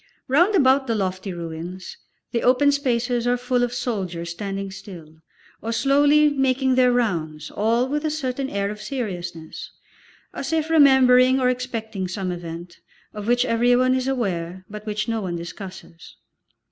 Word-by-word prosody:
Round 345 +10 +3
about 270 -4 +4
the 230 - 0
lofty 185 -1 -2
ruins, 170 +2 -7 0.4
the 235 - 0
open 260 +3 +4
spaces 245 -3 0
are 245 0 +2
full 245 0 0
of 245 -1 0
soldiers 185 -9 -3
standing 195 +1 -5
still, 175 -5 -11 0.4
or 225 - -3
slowly 285 +5 +4
making 265 -1 +1
their 255 -1 +4
rounds, 160 -11 -1
all 230 +4 +1
with 295 +3 -2
a 310 - 0
certain 270 -3 -3
air 200 -2 -2
of 210 0 -8
seriousness, 180 - -5 0.6
as 275 - -5
if 320 0 0
remembering 260 -3 +6
or 250 -1 +3
expecting 225 -6 -3
some 185 0 -3
event, 170 0 -8 0.3
of 210 -1 -7
which 245 +1 +3
everyone 245 +2 +3
is 260 0 -1
aware, 185 -8 -2
but 210 +1 -9
which 210 +1 -2
no 225 -1 -1
one 180 -3 -3
discusses. 175 0 -9
230 Hz, 155 wpm, -23 LUFS, 185-260 Hz, 0.6 s, remembering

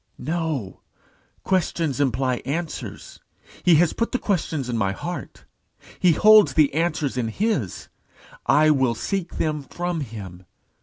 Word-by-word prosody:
"No. 155 - -3 0.6
Questions 165 -6 0
imply 130 -1 +1
answers. 155 +6 -5 0.4
He 175 -2 +5
has 160 +1 +3
put 230 - -2
the - - +2
questions 160 - -2
in 120 - -2
my 100 -4 0
heart; - - -7 0.5
he 180 -3 +4
holds 215 +5 +6
the 150 -4 +4
answers 155 -4 -1
in 120 -2 0
his. 145 - -2 0.6
I 155 +1 +5
will 130 -5 +2
seek 185 - -3
them 155 -2 -1
from 175 +5 -4
him. 100 - -8
150 Hz, 135 wpm, -23 LUFS, 125-175 Hz, 0.6 s, holds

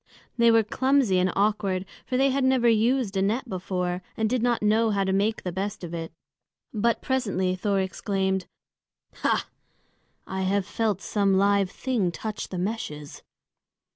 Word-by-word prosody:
They 235 -1 +5
were 225 -1 +5
clumsy 260 -3 +2
and 180 0 +2
awkward, 200 -2 +1 0.2
for 255 - 0
they 270 +1 +3
had 275 0 0
never 260 -2 +3
used 230 -1 +2
a 190 - +1
net 225 +7 0
before, 180 -2 -3 0.2
and 220 - +1
did 250 +2 0
not 240 -2 +1
know 220 +2 +3
how 200 -2 +1
to 190 0 0
make 210 +3 0
the 180 - -3
best 195 +2 -4
of 170 -1 -6
it. 165 -1 -5 0.6
But 230 +2 +1
presently 195 -8 0
Thor 200 +1 0
exclaimed, 190 0 -1 0.7
"Ha! - - 0 0.8
I 190 +1 0
felt 210 0 -1
some 200 -2 +1
live 200 -1 +3
thing 225 -6 -1
touch 215 +4 -5
the 185 - -6
meshes!" 175 -7 -4
205 Hz, 160 wpm, -26 LUFS, 190-230 Hz, 0.8 s, They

